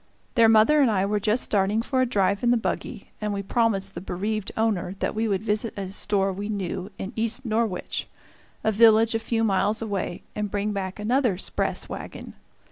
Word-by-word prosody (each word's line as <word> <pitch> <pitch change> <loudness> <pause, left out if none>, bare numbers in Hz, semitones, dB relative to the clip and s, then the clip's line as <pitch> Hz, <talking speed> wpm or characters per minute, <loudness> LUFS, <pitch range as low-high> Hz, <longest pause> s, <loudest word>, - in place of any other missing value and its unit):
Their 230 -2 +5
mother 225 +8 +5
and 265 - +4
I 195 -3 +1
were 210 +1 0
just 215 +4 +1
starting 205 +2 +1
for 260 +1 0
a 255 - +2
drive 200 -3 +1
in 240 - +2
the 245 - +4
buggy, 220 -1 -4
and 210 0 -1
we 200 0 -3
promised 195 -3 +1
the - - -6
bereaved 200 +3 -3
owner 195 -5 0
that - - -2
we 225 +1 0
would 200 -1 -1
visit 215 +1 -1
a 195 -2 -4
store 195 -1 0
we 200 +3 -5
knew 190 -2 -3
in 195 +5 -6
East 230 +3 -1
Norwich, 220 -4 -1 0.6
a 220 - +2
village 225 +1 +5
a 225 - +1
few 225 0 -1
miles 210 +1 +1
away, 200 -5 -3
and 210 -1 -2
bring 205 +1 -1
back 190 -1 -4
another 230 -1 +1
"'spress" - - -2
wagon. - - -8
210 Hz, 200 wpm, -25 LUFS, 195-225 Hz, 0.6 s, Their